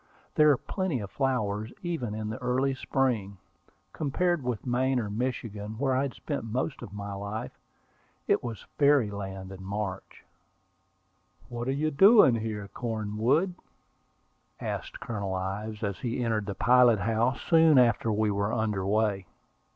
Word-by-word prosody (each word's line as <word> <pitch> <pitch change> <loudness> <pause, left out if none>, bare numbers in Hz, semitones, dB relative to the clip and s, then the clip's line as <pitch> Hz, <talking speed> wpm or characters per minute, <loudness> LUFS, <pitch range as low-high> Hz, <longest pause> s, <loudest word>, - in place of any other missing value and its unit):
There 150 0 +5
are 140 - +5
plenty 185 -6 -2
of 100 -2 -7
flowers, 110 -5 -1
even 135 -12 -3
in 110 0 -4
the 110 - -6
early 130 +2 +1
spring. 120 -7 -1 0.6
Compared 175 +3 0
with 125 -4 -3
Maine 130 +1 +1
or 105 -3 -3
Michigan, 110 -2 -4
where 135 0 +1
I 130 - +2
had 140 -2 -3
spent 145 -6 -4
most 125 +6 -3
of - - -8
my 100 0 -6
life, 100 +2 -5 0.8
it - - +2
was 115 -3 -6
fairy 140 -7 +4
land 95 -1 -6
in 95 -1 -9
March. 100 -1 -5 1.2
"What 120 0 -4
are - - +1
you 155 +3 0
doing 195 - +7
here, 110 -3 -3
Cornwood?" 115 - 0 1.1
asked - - -5
Colonel 100 -5 -3
Ives, 105 +4 -4
as 100 -2 -2
he 125 0 -2
entered 110 -3 -1
the 100 - -3
pilot 125 0 +5
house, 115 +3 +1
soon 160 -3 +6
after 115 -2 +4
we 105 0 +1
were 100 +1 0
under 110 -4 -1
way. 100 -2 0
115 Hz, 150 wpm, -28 LUFS, 105-130 Hz, 1.2 s, doing